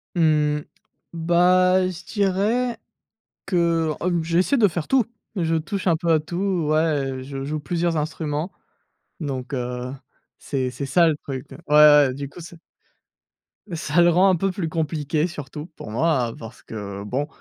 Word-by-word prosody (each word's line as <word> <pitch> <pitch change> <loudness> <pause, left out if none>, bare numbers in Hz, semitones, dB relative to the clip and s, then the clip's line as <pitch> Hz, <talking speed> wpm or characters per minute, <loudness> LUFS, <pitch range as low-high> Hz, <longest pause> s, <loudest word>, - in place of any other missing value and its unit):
Mmh. 150 -2 +2 0.5
Bah, 180 +2 +3
je 175 -1 -8
dirais 215 +4 0 0.7
que, 170 -4 +1
ob 170 -2 0
j'essaie 180 - +2
de 210 -3 +5
faire 170 -2 -4
tout. 260 -5 +3 0.3
Je 165 -3 0
touche 185 +4 -3
un 170 - +4
peu 170 +1 0
à 160 - +4
tout. 175 0 -2
Ouais, 145 -5 0
je 135 0 -6
joue 150 +2 -3
plusieurs 170 +2 -1
instruments. 155 +2 -3 0.7
Donc, 135 -3 -4
heu, 125 0 -3 0.5
c'est 130 -3 -2
c'est 140 - -5
ça 165 +5 +4
le 155 - +2
truc. 135 -1 -7
Ouais, - - -9
ouais, 150 -3 +7
du 140 0 -6
coup, 160 - -13
c'est 170 +1 -11 1.2
ça 165 +1 +1
le 175 - +6
rend 180 +3 +4
un 185 - +4
peu 195 +3 0
plus 175 -4 -3
compliqué 155 0 -1
surtout 150 -1 -8
pour 105 - -9
moi, 125 -3 +1
parce 115 +2 -11
que, 100 -2 -7
bon, 130 +8 -2
160 Hz, 160 wpm, -23 LUFS, 140-175 Hz, 1.2 s, ouais